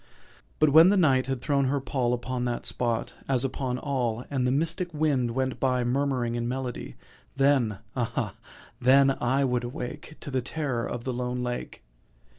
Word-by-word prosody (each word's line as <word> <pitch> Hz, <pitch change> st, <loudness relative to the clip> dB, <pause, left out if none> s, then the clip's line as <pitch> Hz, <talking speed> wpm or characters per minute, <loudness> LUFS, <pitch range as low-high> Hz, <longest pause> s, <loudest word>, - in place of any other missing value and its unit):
But 155 Hz, -1 st, +4 dB
when 160 Hz, +4 st, +8 dB
the 205 Hz, -, +3 dB
Night 135 Hz, -7 st, +3 dB
had 135 Hz, -2 st, -2 dB
thrown 140 Hz, 0 st, +1 dB
her 140 Hz, +2 st, +1 dB
pall 130 Hz, -2 st, -1 dB
Upon 125 Hz, +1 st, -3 dB
that 120 Hz, -1 st, -2 dB
spot, 120 Hz, -2 st, -1 dB, 0.2 s
as 130 Hz, -1 st, +2 dB
upon 130 Hz, -1 st, -2 dB
all, 125 Hz, -4 st, -2 dB
And 130 Hz, -3 st, +1 dB
the -, -, +2 dB
mystic 165 Hz, +5 st, -1 dB
wind 145 Hz, -5 st, +1 dB
went 130 Hz, -1 st, -1 dB
by 125 Hz, -2 st, +1 dB
Murmuring 125 Hz, -1 st, 0 dB
in 120 Hz, 0 st, -2 dB
melody— 125 Hz, -1 st, -4 dB, 0.4 s
Then—ah 120 Hz, -4 st, 0 dB, 0.5 s
then 135 Hz, +2 st, +5 dB
I 130 Hz, +3 st, +2 dB
would 125 Hz, -2 st, 0 dB
awake 125 Hz, +3 st, -6 dB
To 140 Hz, -, -6 dB
the 130 Hz, -1 st, 0 dB
terror 130 Hz, -3 st, -2 dB
of 120 Hz, -1 st, -5 dB
the 130 Hz, -, -2 dB
lone 125 Hz, 0 st, -2 dB
lake. 125 Hz, 0 st, -5 dB
130 Hz, 170 wpm, -27 LUFS, 120-140 Hz, 0.5 s, when